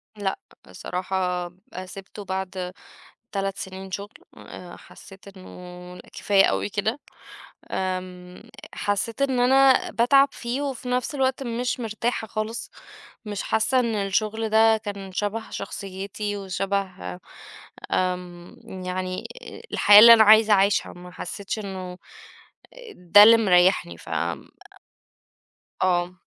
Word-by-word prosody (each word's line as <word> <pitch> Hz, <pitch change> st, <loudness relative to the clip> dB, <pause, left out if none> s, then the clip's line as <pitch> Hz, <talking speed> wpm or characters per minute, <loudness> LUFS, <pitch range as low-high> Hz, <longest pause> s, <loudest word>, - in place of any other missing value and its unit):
لأ، 200 Hz, -2 st, -3 dB, 0.3 s
بصراحة، 180 Hz, -1 st, -3 dB, 0.3 s
آآ، 185 Hz, +1 st, -6 dB
سيبته 195 Hz, +2 st, -10 dB
بعد 190 Hz, -1 st, -4 dB, 0.6 s
3 195 Hz, -1 st, -2 dB
سنين 190 Hz, 0 st, -8 dB
شغل. 200 Hz, +2 st, -5 dB, 0.3 s
آآ، 175 Hz, -1 st, -11 dB
حسيت 195 Hz, 0 st, -15 dB
إنه 180 Hz, -1 st, -11 dB
كفاية 195 Hz, -1 st, +3 dB
أوي -, -, -1 dB
كده. 215 Hz, +5 st, -2 dB, 0.7 s
آمم، 185 Hz, -1 st, -5 dB, 0.3 s
حسيت 205 Hz, +5 st, -2 dB
إن 265 Hz, -2 st, 0 dB
أنا 265 Hz, +1 st, +4 dB
باتعب 275 Hz, +4 st, +4 dB
فيه، 245 Hz, +3 st, -4 dB
وفي 265 Hz, -3 st, -5 dB
نفس 250 Hz, +3 st, -1 dB
الوقت 265 Hz, 0 st, 0 dB
مش 245 Hz, +1 st, -3 dB
مرتاحة 225 Hz, +1 st, -3 dB
خالصk 215 Hz, +2 st, -5 dB, 0.6 s
مش 205 Hz, -2 st, -4 dB
حاسة 230 Hz, +4 st, +1 dB
إن 235 Hz, -3 st, -1 dB
الشغل 215 Hz, +2 st, -1 dB
ده 220 Hz, +1 st, +4 dB
كان 200 Hz, -3 st, -7 dB
شبه 210 Hz, +3 st, -3 dB
شخصيتي 200 Hz, +1 st, -5 dB
وشبه 190 Hz, -, -4 dB, 0.7 s
آمم، 180 Hz, 0 st, -4 dB
يعني، 185 Hz, 0 st, -4 dB, 0.5 s
الحياة 205 Hz, 0 st, +8 dB
اللي 230 Hz, +2 st, +11 dB
أنا 225 Hz, -1 st, +7 dB
عايزة 215 Hz, 0 st, +6 dB, 0.2 s
أعيشهاk 205 Hz, -, -1 dB
ما 180 Hz, 0 st, -12 dB
حسيتش 200 Hz, +4 st, -6 dB
إنه 185 Hz, -3 st, -7 dB, 1.0 s
ده 180 Hz, +3 st, +7 dB
اللي 230 Hz, +2 st, +8 dB
مريحني، 180 Hz, -, +3 dB
ف -, -, -13 dB, 1.7 s
آه. 180 Hz, 0 st, 0 dB
200 Hz, 115 wpm, -24 LUFS, 185-220 Hz, 1.7 s, اللي